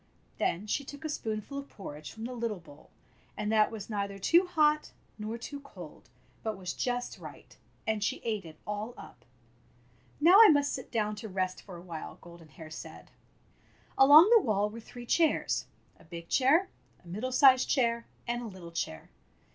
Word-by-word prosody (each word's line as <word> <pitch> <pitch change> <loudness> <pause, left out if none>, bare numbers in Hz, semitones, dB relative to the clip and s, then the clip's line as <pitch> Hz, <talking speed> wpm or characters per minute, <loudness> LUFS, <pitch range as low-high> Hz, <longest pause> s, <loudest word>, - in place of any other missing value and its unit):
Then 185 +5 0
she 280 +6 -1
took 285 +2 -10
a - - -2
spoonful 220 0 -4
of 280 - -10
porridge 150 -6 -9
from 225 - -9
the 250 - -5
little 230 -3 -3
bowl, 150 -3 -17 0.5
and 210 0 -2
that 215 -1 +4
was 215 -3 -7
neither 200 -2 -3
too 340 - +4
hot 305 -3 +2 0.3
nor 215 +2 -4
too 280 +5 -7
cold, 180 - -13 0.3
but 220 -3 -3
was 185 -2 -5
just 245 0 -3
right, - - -12 0.3
and 215 -2 -1
she - - 0
ate 215 -3 -2
it 160 -2 -12
all 210 +4 -4
up. 120 - -13 1.0
"Now 355 +8 +8
I 445 - +10
must 285 -2 +3
sit 260 - -6
down 215 -2 -1
to 220 +1 -7
rest 185 -1 -2
for 185 -3 -11
a 170 - -12
while," 165 -3 -7
Golden 170 -2 -14
Hair 155 +3 -12
said. - - -10 0.8
Along 300 +9 +8
the 455 - +7
wall 210 - 0
were 230 - -8
three 240 +2 -11
chairs 320 +6 +1
— - - -34
a - - -18
big 170 0 -10
chair, 310 +9 +3 0.4
a - - -15
middle 215 +9 -4
sized 260 0 +6
chair, 235 -3 +1 0.2
and 240 0 -1
a 240 - -6
little 185 -4 -10
chair. 80 - -5
220 Hz, 185 wpm, -30 LUFS, 185-270 Hz, 1.0 s, I